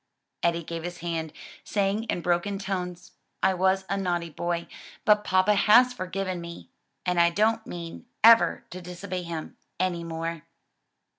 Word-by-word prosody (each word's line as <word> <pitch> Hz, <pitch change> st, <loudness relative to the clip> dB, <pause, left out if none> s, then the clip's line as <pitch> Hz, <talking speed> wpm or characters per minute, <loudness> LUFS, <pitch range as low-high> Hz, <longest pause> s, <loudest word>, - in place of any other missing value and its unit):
Eddie 170 Hz, 0 st, +1 dB
gave 165 Hz, +1 st, -5 dB
his 175 Hz, +1 st, -6 dB
hand, 165 Hz, -2 st, -3 dB, 0.3 s
saying 205 Hz, +2 st, 0 dB
in 180 Hz, -, -2 dB
broken 175 Hz, +4 st, 0 dB
tones, 180 Hz, -3 st, -4 dB, 0.3 s
"I 190 Hz, -, +4 dB
was 190 Hz, +1 st, +2 dB
a 195 Hz, -, -1 dB
naughty 175 Hz, -3 st, -1 dB
boy, 170 Hz, +2 st, -2 dB, 0.4 s
but 210 Hz, -1 st, +5 dB
papa 185 Hz, +1 st, +3 dB
has 245 Hz, +5 st, +6 dB
forgiven 185 Hz, -2 st, -3 dB
me, 170 Hz, 0 st, -9 dB, 0.4 s
and 180 Hz, -1 st, +1 dB
I 170 Hz, 0 st, +6 dB
don't 220 Hz, +5 st, +1 dB
mean 170 Hz, +7 st, -7 dB, 0.2 s
ever 230 Hz, 0 st, +6 dB
to 185 Hz, -, -7 dB
disobey 180 Hz, +1 st, -5 dB
him 165 Hz, -2 st, -6 dB, 0.2 s
any 175 Hz, -2 st, 0 dB
more." 165 Hz, 0 st, -4 dB
180 Hz, 150 wpm, -27 LUFS, 170-195 Hz, 0.4 s, has